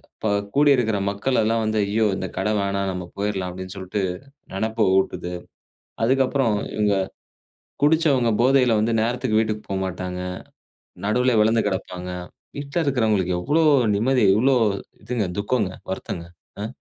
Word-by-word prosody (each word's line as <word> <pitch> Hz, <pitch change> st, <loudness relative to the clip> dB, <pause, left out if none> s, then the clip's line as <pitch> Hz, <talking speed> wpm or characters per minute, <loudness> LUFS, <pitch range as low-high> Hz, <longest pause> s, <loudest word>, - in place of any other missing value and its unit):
இப்ப -, -, -4 dB, 0.3 s
கூடி 145 Hz, 0 st, +5 dB
இருக்கிற 110 Hz, -4 st, +1 dB
மக்கள் 105 Hz, +6 st, 0 dB
எல்லாம் 115 Hz, +1 st, +1 dB
வந்து 110 Hz, 0 st, 0 dB
ஐயோ 110 Hz, +2 st, +2 dB
இந்த 95 Hz, -, -3 dB
கட 95 Hz, +3 st, 0 dB
வேணாம், 100 Hz, 0 st, -1 dB
நம்ம 90 Hz, 0 st, -4 dB
போயிறலாம் 100 Hz, -3 st, -2 dB
அப்டின்னு 95 Hz, +1 st, -8 dB
சொல்ட்டு, 95 Hz, +2 st, -3 dB, 0.5 s
நெனப்ப 110 Hz, +2 st, 0 dB
ஊட்டுது. 90 Hz, -2 st, -1 dB, 0.7 s
அதுக்கப்புறம் 130 Hz, -2 st, +2 dB, 0.2 s
இவங்க, 105 Hz, -2 st, +2 dB, 0.9 s
குடிச்சவங்க 145 Hz, -5 st, +3 dB
போதையில 125 Hz, -3 st, +4 dB
வந்து 115 Hz, +2 st, +1 dB
நேரத்துக்கு 120 Hz, -1 st, 0 dB
வீட்டுக்கு 110 Hz, -1 st, -2 dB
போமாட்டாங்க. 90 Hz, -1 st, -3 dB, 0.9 s
நடுவுலேயே 125 Hz, +1 st, +3 dB
விழுந்து 110 Hz, +1 st, +3 dB
கிடப்பாங்க. 90 Hz, -1 st, -4 dB, 0.5 s
வீட்ல 140 Hz, +3 st, -4 dB
இருக்கிறவங்களுக்கு 110 Hz, -9 st, +1 dB
எவ்ளோ 150 Hz, -, +1 dB, 0.3 s
நிம்மதி, 120 Hz, +3 st, +2 dB
எவ்ளோ 130 Hz, +4 st, +3 dB, 0.5 s
இதுங்க 115 Hz, -4 st, -1 dB
துக்கங்க, 100 Hz, -1 st, 0 dB, 0.2 s
வருத்தங்க. 85 Hz, -2 st, -5 dB, 0.4 s
அ. -, -, -2 dB
110 Hz, 130 wpm, -23 LUFS, 95-125 Hz, 0.9 s, கூடி